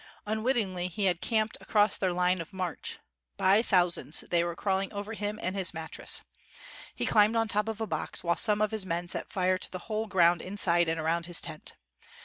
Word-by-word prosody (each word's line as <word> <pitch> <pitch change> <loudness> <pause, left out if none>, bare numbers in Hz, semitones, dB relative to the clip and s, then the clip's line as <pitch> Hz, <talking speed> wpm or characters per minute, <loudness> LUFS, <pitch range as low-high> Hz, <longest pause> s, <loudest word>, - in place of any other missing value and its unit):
Unwittingly 215 -5 0
he 190 +3 -2
had 175 -3 +1
camped 220 -1 0
across 210 0 +3
their 185 -2 0
line 180 0 +1
of 165 +4 -10
march. 185 -3 -4 0.4
By 195 +3 +4
thousands 175 -7 +3
they 170 -1 +3
were 170 -1 -3
crawling 195 +1 -1
over 205 +1 -5
him 210 0 -4
and 185 -2 -2
his 185 -4 0
mattress. 160 0 -2 0.7
He - - -2
climbed 215 +1 +4
on 225 0 +2
top 210 0 0
of 220 -1 -4
a 220 - -1
box, - - -3
while 170 0 +1
some 210 +2 +3
of 215 - 0
his 220 -2 0
men 175 -1 -3
set - - -2
fire 185 -1 +1
to - - -2
the 185 - -4
whole 215 +1 -1
ground 175 -4 +3
inside 175 -3 +1
and 165 0 -1
around 165 +2 -1
his 175 -1 0
tent. 155 -2 -5
190 Hz, 205 wpm, -29 LUFS, 175-210 Hz, 0.7 s, By